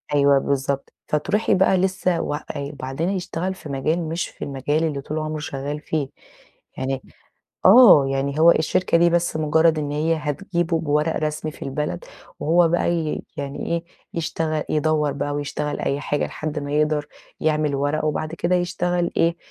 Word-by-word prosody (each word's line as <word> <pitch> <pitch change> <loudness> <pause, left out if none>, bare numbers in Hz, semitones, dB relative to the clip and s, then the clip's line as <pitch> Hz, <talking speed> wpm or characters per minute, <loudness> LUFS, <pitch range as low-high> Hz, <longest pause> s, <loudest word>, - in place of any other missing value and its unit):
أيوه 140 -1 +5
بالضبط، 140 0 -2
فتروحي 190 +9 +1
بقى 190 0 +4
لسه 185 -1 +1
وإ 145 - -2 0.2
وبعدين 140 +3 -3
هيشتغل 185 -1 -2
في 170 -5 -11
مجال 155 +4 -1
مش 165 +2 -2
في - - -9
المجال 145 +3 -1
اللي 150 -4 -1
طول 155 +3 -4
عمره 155 0 -3
شغال 145 0 -4
فيه، 150 -2 -2 0.7
يعني 135 0 -2 0.6
آه، 195 - +9
يعني 140 +2 -1
هو 165 +1 +8
الشركة 170 +2 +2
دي 170 0 +5
بس 175 -1 +1
مجرد 155 +1 +3
إن 145 -1 -3
هي 155 +3 +1
هتجيبه 165 +2 -1
بورق 150 0 +1
رسمي 155 0 -2
في - - -17
البلد، 150 - -3 0.3
وهو 170 +2 +4
بقى 175 0 +1
ي 160 -3 -2
يعني 140 0 -4
إيه 170 0 -1 0.3
يشتغل 160 -2 -2
يدَوّر 155 -1 +1
بقى 145 +1 -3
ويشتغل 145 0 -3
أي 140 - -1
حاجة 145 0 -1
لحد 155 -1 -4
ما 145 0 -5
يقدر 150 0 +1 0.3
يعمل 155 -2 +1
ورقه، 145 +3 0
وبعد 155 +1 -2
كده 175 +2 +1
يشتغل 175 0 0
إيه، 170 +1 +2
155 Hz, 165 wpm, -22 LUFS, 145-170 Hz, 0.7 s, آه